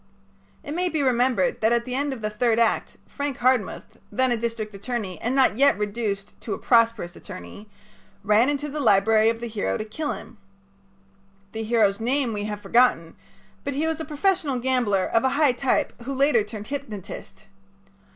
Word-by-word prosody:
It 290 - -5
may 360 +2 0
be 315 -4 -1
remembered 245 -5 +1
that 220 +1 +3
at 235 0 +1
the 250 - -5
end 285 +2 0
of 260 -4 -6
the 215 0 -2
third 225 +1 +1
act 230 -1 +1
Frank 285 -2 -4
Hardmuth, 240 -3 0
then 260 0 +1
a - - +3
district 225 -2 -4
attorney 200 -4 -5
and 245 +3 -1
not 260 -4 +3
yet 280 -4 +5
reduced 205 -1 -3
to 220 - -3
a - - -8
prosperous 230 -7 +2
attorney, 205 +2 -10 0.6
ran 215 +6 +4
into 290 0 -2
the 300 +1 -5
library 220 -2 +4
of 230 0 -2
the - - -3
hero 215 -2 -2
to 215 - -4
kill 290 +8 -3
him. 230 - -11 1.1
The 220 - -5
hero's 215 -3 +2
name 250 +1 0
we 205 -1 -3
have 210 -1 -5
forgotten, 230 -10 +2 0.5
but 280 - -3
he 300 +3 0
was 320 0 -1
a - - -3
professional 310 -2 0
gambler, 240 -7 +1
of 230 - +1
a 265 - +3
high 295 -3 +5
type, 250 +2 0
who 270 +3 -4
later 275 -4 +3
turned 210 0 -8
hypnotist. 215 -7 -7
235 Hz, 185 wpm, -24 LUFS, 215-270 Hz, 1.1 s, yet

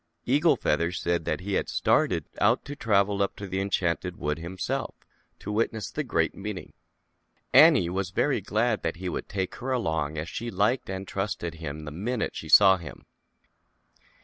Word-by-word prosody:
Eagle 150 +6 +4
Feather 85 +3 0
said 85 -2 -1
he 100 +2 -4
had - - 0
started - - +2
out - - +3
to 145 - -6
travel 100 -5 +1
up 100 - 0
to 100 - -7
the 95 0 -2
Enchanted 90 -5 -1
Wood 75 +1 -2
himself 90 +2 -4 0.4
to 105 - -6
witness 110 -1 -1
the - - -2
Great - - 0
Meeting. 100 -2 -7 0.8
Annie 85 - +7
was 95 +1 -2
very 125 +6 +1
glad 110 +3 0
that 80 0 -2
he 90 +2 -6
would - - -4
take 95 -2 -2
her 130 +3 -4
along 80 - -1
as 80 +2 -3
she 120 +7 -5
liked 105 +5 0
and 95 0 -5
trusted 95 -4 -3
him 80 -2 -7
the 75 - -6
minute 110 +8 -3
she 80 - -7
saw 95 +2 +8
him. 85 -4 -11
95 Hz, 175 wpm, -27 LUFS, 85-105 Hz, 0.8 s, saw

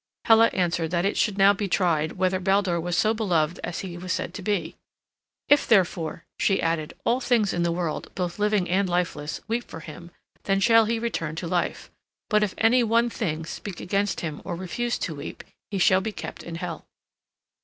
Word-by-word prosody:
Hela 225 0 +7
answered 170 -4 0
that 175 +1 0
it 200 - +1
should 210 -3 +1
now 195 +1 +6
be 205 0 -3
tried 165 -5 +1
whether 185 0 0
Baldur 190 -2 +1
was 175 +1 -2
so 215 +1 +3
beloved 175 -7 0
as 175 - -3
he 175 -3 -7
was 185 +1 -5
said 170 - -2
to 200 - -6
be. 205 +2 -2 0.7
"If, 290 0 +4
therefore," 175 -6 +1
she 195 - +2
added, 165 -2 -1
"all 245 +2 +2
things 235 -5 +2
in 175 - -1
the 170 0 +1
world, 170 -2 -3
both 180 +1 -3
living 210 -3 +2
and 190 +2 +1
lifeless, 175 -4 -2
weep 235 +2 -1
for 165 - -10
him, 165 +3 -10 0.4
then 195 0 +2
shall 225 +2 +5
he 230 +2 0
return 195 -9 -3
to 170 +1 -4
life; 175 +1 -2 0.4
but 210 0 +4
if 210 -3 0
any 240 +3 +4
one 230 +1 +2
thing 160 -8 -3
speak 185 +2 -7
against 200 +2 -1
him 155 -3 -5
or 175 -1 -4
refuse 235 +7 -2
to 165 - -3
weep, 145 -1 -8 0.3
he 200 - -3
shall 185 +1 +4
be 220 - -3
kept - - -7
in 170 - -7
Hel." 170 -1 -6
185 Hz, 200 wpm, -25 LUFS, 170-210 Hz, 0.7 s, Hela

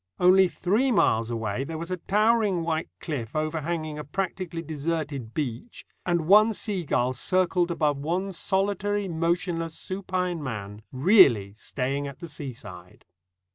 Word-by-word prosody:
Only 185 +1 +6
three 210 +10 +1
miles 115 - +2
away 115 +1 -2
there 160 +3 -5
was 170 +3 -6
a 185 - -1
towering 210 -1 +2
white 160 -1 -2
cliff 130 -6 -5
overhanging 155 0 -2
a - - -4
practically 175 +1 -4
desert 155 0 -3 0.2
beach; 145 - -4 0.2
and 175 -1 +2
one 215 +5 +6
seagull 175 - -1
circled 180 +5 +1
above 150 -4 +1
one 180 +7 -2
solitary, 200 +2 0
motionless, 165 -1 -1
supine 185 -3 -3
man, 105 -6 -6
really 130 - +5
staying 135 +5 -3
at 140 - -8
the 170 - -8
seaside. 115 - -9
165 Hz, 135 wpm, -26 LUFS, 140-185 Hz, 0.2 s, Only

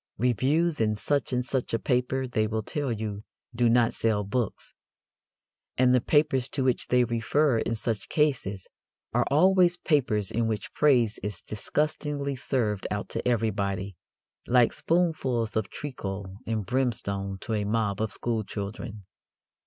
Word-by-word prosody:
Reviews 135 - +1
in 105 -1 +2
such 140 +6 0
and 125 0 0
such 130 -3 -1
a - - -1
paper, 130 +2 0
they 110 -3 0
will 110 0 -2
tell 145 +3 -2
you, 105 -2 -4 0.3
do 120 0 +3
not 120 0 +3
sell 110 -2 +1
books. 105 +2 -3 1.0
And 125 0 +4
the 125 - +4
papers 135 -3 +2
to 135 -1 -2
which 130 -1 +1
they 125 0 +4
refer 120 +3 +1
in 115 - -1
such 110 -2 -3
cases 125 - 0 0.5
are - - +2
always 180 +3 +4
papers 120 - +1
in 115 0 0
which 105 -3 -3
praise 125 -7 +3
is 105 -2 -5
disgustingly 145 +4 -2
served 115 -6 -1
out 105 -1 -3
to - - -3
everybody, 100 -5 -1 0.5
like 120 -1 +4
spoonfuls 135 -10 0
of 110 -3 0
treacle 95 -8 -6
and 110 -3 -1
brimstone 100 -6 -1
to 115 - -3
a 105 -1 0
mob 105 -1 0
of 110 - -1
schoolchildren. 110 -2 -4
115 Hz, 145 wpm, -27 LUFS, 105-135 Hz, 1.0 s, And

